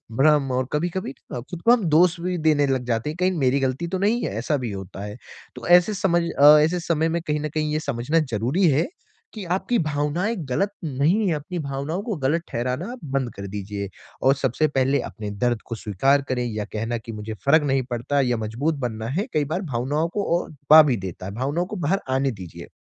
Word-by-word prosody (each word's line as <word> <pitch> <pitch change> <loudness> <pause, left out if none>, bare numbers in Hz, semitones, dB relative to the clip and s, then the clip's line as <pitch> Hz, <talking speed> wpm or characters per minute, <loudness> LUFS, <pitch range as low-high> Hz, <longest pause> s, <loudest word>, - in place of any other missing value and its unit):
भ्रम 145 0 +3
और 130 0 0
कभी-कभी 175 -1 -2 0.2
अ, 125 - -3
खुद 165 +8 -8
को 235 - +5
हम 240 -3 +4
दोष 170 +3 +4
भी 180 0 -1
देने 155 -2 +3
लग 130 -2 0
जाते 115 +3 -1
हैं, 155 - -6
कहीं 185 +1 +3
मेरी 135 0 +2
गलती 135 +5 -1
तो 185 +2 -2
नहीं 215 +5 +1
है, - - -2
ऐसा 145 +6 0
भी 115 - -3
होता 95 0 -7
है। 105 0 -6 0.4
तो - - -7
ऐसे 180 +4 +6
समझ 190 -4 +2 0.2
अ, 150 +2 +9
ऐसे 165 +4 +2
समय 165 -2 0
में 170 +1 -1
कहीं 150 -2 -1
न 150 - -2
कहीं 155 -1 -1
ये 155 - +1
समझना 140 +2 0
ज़रूरी 125 - +2
है 145 +3 +2 0.5
कि 210 -4 -7
आपकी 220 +5 0
भावनाएँ 155 +8 -1
ग़लत 195 +10 0
नहीं 160 +9 +1
हैं, 165 - +1
अपनी 160 +5 -5
भावनाओं 140 +4 -3
को 225 -3 -3
ग़लत 160 +5 +2
ठहराना 125 - -2
आप 250 - -8
बंद 130 -5 -1
कर 100 0 -6
दीजिए 100 0 -5 0.3
और 135 - +5
सबसे 135 +3 +1
पहले 135 -1 +1
अपने 105 -1 -6 0.2
दर्द 120 -2 +1
को 115 - -5
स्वीकार 125 +7 +2
करें 125 -1 0
या 105 -3 -3
कहना 115 +2 -2
कि 115 0 -9
मुझे 105 0 -6
फ़र्क 150 +3 +5
नहीं 135 -1 +2
पड़ता 120 +4 0
या 125 -3 +1
मज़बूत 120 +9 -1
बनना 110 -1 -4
है, 180 - -1
कई 150 -2 +1
बार 160 +7 -2
भावनाओं 145 +1 -1
को 205 - -1 0.2
और - - -7
दबा 150 +2 +7
भी 130 -6 +1
देता 95 -1 -7
है, 95 - -5
भावनाओं 145 +8 -1
को 200 - -7
बाहर 185 +2 0
आने 135 +1 +1
दीजिए। 95 -7 -9
145 Hz, 225 wpm, -23 LUFS, 120-170 Hz, 0.5 s, अ